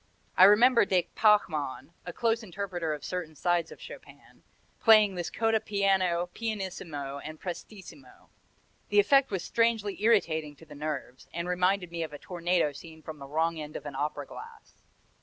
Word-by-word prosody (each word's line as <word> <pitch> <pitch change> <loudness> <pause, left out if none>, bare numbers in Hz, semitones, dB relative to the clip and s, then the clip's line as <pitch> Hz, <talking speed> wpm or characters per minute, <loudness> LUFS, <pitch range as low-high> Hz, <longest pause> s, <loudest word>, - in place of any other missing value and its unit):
I 185 - +8
remember 230 +5 +6
de 185 -3 +1
Pachmann 170 -8 +1
a - - -3
close 230 +5 0
interpreter 180 -5 -4
of 150 -2 -5
certain 175 -4 -5
sides 175 +1 0
of - - -12
Chopin - - -13 0.4
playing 215 -3 +6
this 175 -2 -4
coda 225 -1 +1
piano, 190 -4 +1
pianissimo 175 -10 -5
and 155 +2 -9
prestissimo. 170 -7 -10 0.6
The 205 - +4
effect 270 +6 +4
was 190 -4 -3
strangely 225 -3 0
irritating 160 -9 +2
to 160 - -16
the 150 - -13
nerves, 145 -4 -6
and 170 +1 -4
reminded 180 0 0
me 170 -1 -4
of 160 -2 -4
a - - -6
tornado 175 -1 0
seen 160 +2 -12
from 155 -2 -8
the 140 - -9
wrong 160 +3 0
end 150 0 -8
of - - -7
an 145 - -6
opera 145 +1 -3
glass. 450 - -13
175 Hz, 165 wpm, -28 LUFS, 155-205 Hz, 0.6 s, I